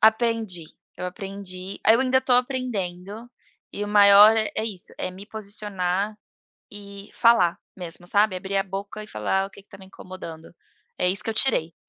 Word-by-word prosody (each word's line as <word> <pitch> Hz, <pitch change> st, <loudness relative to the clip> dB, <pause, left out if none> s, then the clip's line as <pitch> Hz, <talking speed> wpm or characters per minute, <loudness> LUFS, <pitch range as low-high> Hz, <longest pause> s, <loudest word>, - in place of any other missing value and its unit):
Aprendi, 220 Hz, -6 st, +2 dB, 0.3 s
eu 180 Hz, -, -4 dB
aprendi, 195 Hz, -1 st, -7 dB
aí 220 Hz, -, +7 dB
eu 235 Hz, -, +2 dB
ainda 260 Hz, 0 st, +3 dB
estou 260 Hz, -1 st, +3 dB
aprendendo, 225 Hz, -4 st, -3 dB, 0.4 s
e 205 Hz, -, -3 dB
o -, -, -6 dB
maior 205 Hz, +1 st, +8 dB
é 220 Hz, 0 st, -1 dB
isso, 195 Hz, -5 st, -5 dB
é -, -, -3 dB
me 190 Hz, +2 st, -12 dB
posicionar 205 Hz, -2 st, -3 dB, 0.5 s
e 200 Hz, -1 st, -11 dB
falar 230 Hz, -8 st, +4 dB, 0.2 s
mesmo 175 Hz, -1 st, -8 dB
sabe, 205 Hz, 0 st, +2 dB
abrir 195 Hz, +2 st, -4 dB
a -, -, +2 dB
boca 200 Hz, +2 st, -6 dB
e 215 Hz, -, -10 dB
falar 190 Hz, -, -1 dB
o -, -, -14 dB
que 200 Hz, -, -15 dB
que -, -, -42 dB
está 195 Hz, -, -14 dB
me 190 Hz, -, -13 dB
incomodando, 170 Hz, -4 st, -10 dB, 0.4 s
é 180 Hz, -, +2 dB
isso 195 Hz, +3 st, -1 dB
que -, -, -1 dB
eu 220 Hz, -, -4 dB
tirei. 170 Hz, -, +1 dB
200 Hz, 180 wpm, -24 LUFS, 185-220 Hz, 0.5 s, maior